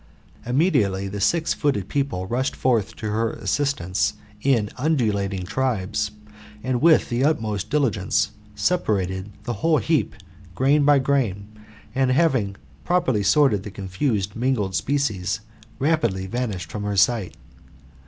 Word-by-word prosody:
Immediately 120 - +1
the 100 +1 -5
six 165 - +2
footed 130 - 0
people 135 -8 -1
rushed 125 +6 -1
forth 115 -6 +1
to 110 -2 -4
her 115 +1 0
assistance 110 -10 0 0.3
in 115 -6 +2
undulating 105 - 0
tribes, 105 -3 -1 0.5
and 125 -1 -1
with 160 0 +5
the 120 +2 0
utmost 110 - 0
diligence 110 -8 +1 0.2
separated 100 - 0
the 120 - -3
whole 160 -1 +3
heap, 120 - 0 0.4
grain 140 +4 +3
by 145 0 +6
grain, 125 -8 0 0.4
and, 130 0 +2
having 130 -8 +2 0.3
properly 175 -12 +1
sorted 105 0 +3
the 105 - -7
confusedly 100 +2 -2
mingled 115 -7 0
species, 105 -2 -1 0.4
rapidly 120 -11 +1
vanished 95 -7 -3
from 105 - -4
her 105 -1 -2
sight. 100 0 +2
115 Hz, 125 wpm, -23 LUFS, 100-140 Hz, 0.5 s, by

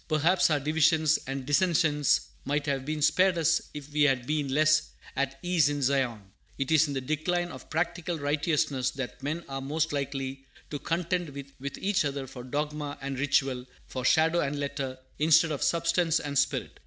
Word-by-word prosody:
Perhaps 165 +4 +3
our 150 -2 +2
divisions 155 +1 +3
and 135 -1 -4
dissensions 150 -2 +3 0.2
might 145 +1 -1
have 135 -2 -1
been 155 -1 -2
spared 185 +2 +4
us 160 0 +3
if 145 0 -9
we 150 - +1
had 135 -4 +3
been 150 0 -1
less 155 +2 +4 0.3
"at 135 0 -1
ease 175 -5 +3
in 145 0 -2
Zion." 130 -4 +1 0.4
It 135 +1 -2
is 160 -1 +5
in 140 - -4
the 135 - -1
decline 175 +5 -1
of - - -11
practical 170 +1 -2
righteousness 145 -2 0
that 130 -2 -6
men 155 +5 -3
are 135 0 -5
most 155 +3 -1
likely 135 -1 -3 0.3
to 145 - -3
contend 175 +1 -1
with 140 -1 -8
each 195 -2 +1
other 140 -1 -3
for 125 -1 -9
dogma 145 +2 -3
and 135 -1 -4
ritual, 135 -2 +1 0.2
for 130 - -5
shadow 160 +5 +3
and 145 -2 -1
letter, 140 -2 -3 0.2
instead 160 +1 +5
of 145 - -3
substance 170 0 +2
and 145 -1 -5
spirit. - - -1
145 Hz, 180 wpm, -28 LUFS, 135-160 Hz, 0.4 s, is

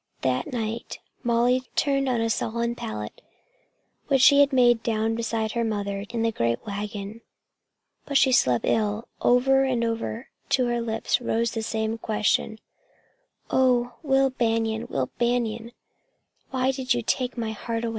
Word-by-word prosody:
That 130 -1 0
night 230 -1 -4 0.2
Molly 240 +2 +2
turned 275 -2 +1
on 240 -2 +1
a 230 - 0
sodden 235 +1 -1
pallet 105 - -6 0.9
which 270 -3 +3
she 285 +1 +7
had 285 0 +5
made 240 -3 +4
down 225 -1 0
beside 225 -1 -2
her 235 0 -1
mother 200 -2 -2
in 230 -1 -2
the 230 - +2
great 115 - -1
wagon. 205 +1 -5 0.9
But 280 - +2
she 270 -1 +4
slept 125 - +3
ill. 215 +1 0
Over 270 +2 +4
and 255 -3 0
over 230 +1 -3 0.2
to 255 - +2
her 240 0 0
lips 225 +1 -1
rose 235 -1 0
the 225 - -3
same 220 0 -2
question: 215 0 0 0.9
"Oh, 245 -2 +2
Will 270 -2 +2
Banion, 225 -2 0
Will 130 -2 -2
Banion, 235 -1 0 0.8
why 260 0 +1
did 260 -2 -1
you 240 - -2
take 250 +2 -1
away 230 -1 -2
my - - -3
heart?" 230 +2 -4
230 Hz, 155 wpm, -25 LUFS, 220-250 Hz, 0.9 s, she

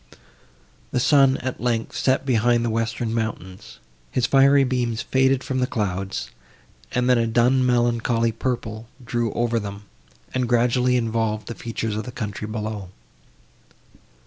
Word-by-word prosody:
The - - 0
sun, 135 0 +4
at 130 0 -4
length, 115 -2 -1
set 130 +1 +1
behind 120 -1 +2
the 115 - 0
western 115 0 -2
mountains; 100 -5 -5 0.3
his 125 - 0
fiery 140 +1 +5
beams 120 -3 -1
faded 130 0 +2
from 130 -1 -2
the 125 - +1
clouds, 95 -4 -3 0.6
and 125 0 0
then 125 -2 +4
a 115 - +1
dun 120 +3 +3
melancholy 120 -1 +1
purple 115 -2 -4 0.2
drew 120 -1 -1
over 120 -1 0
them, 100 -1 -7 0.5
and 125 -2 -1
gradually 125 +1 +3
involved 115 -2 -1
the 115 - -4
features 115 -2 -4
of 110 - -3
the 125 - -6
country 105 -3 -5
below. 110 -3 -5
120 Hz, 145 wpm, -23 LUFS, 110-125 Hz, 0.6 s, fiery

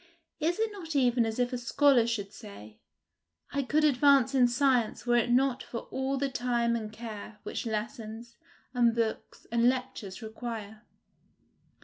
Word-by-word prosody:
Is 335 +3 0
it 445 0 0
not 335 -7 -7
even 245 -3 +3
as 220 - -4
if 245 0 0
a 250 - -2
scholar 245 0 +4
should 210 -3 -3
say, 105 - -12 0.7
I 280 - 0
could 300 +3 +1
advance 280 -2 +4
in 255 -2 +5
science 245 -3 +1
were 240 0 +3
it 240 0 +1
not 255 +1 +2
for 235 - -6
all 265 +1 -1
the 280 +1 0
time 240 -2 0
and 215 -2 -4
care 220 -1 -8
which - - -4
lessons, 225 +1 -5 0.4
and 235 -2 +3
books, 230 -2 -3
and 235 +1 +4
lectures 245 -5 -4
require? 220 -1 -7
240 Hz, 155 wpm, -29 LUFS, 225-265 Hz, 0.7 s, in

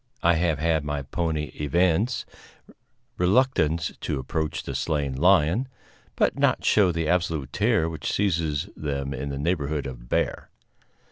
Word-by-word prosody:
I 85 - +5
have 80 -2 +1
had 80 0 +1
my 75 -1 -3
pony 75 +1 -2
evince 90 - +1 0.9
reluctance 90 - +2
to 75 - -2
approach 75 +4 -3
the - - -5
slain 75 -3 -1
lion, 90 - +3 0.5
but - - +1
not - - +2
show 100 -4 +4
the 80 -1 -2
absolute 85 -5 0
terror 80 - +2
which 80 -1 -4
seizes 85 -5 0
them 70 -2 -3
in 70 +2 -4
the 70 - -4
neighborhood 75 -2 -1
of - - -8
bear. - - -1
80 Hz, 140 wpm, -25 LUFS, 70-85 Hz, 0.9 s, I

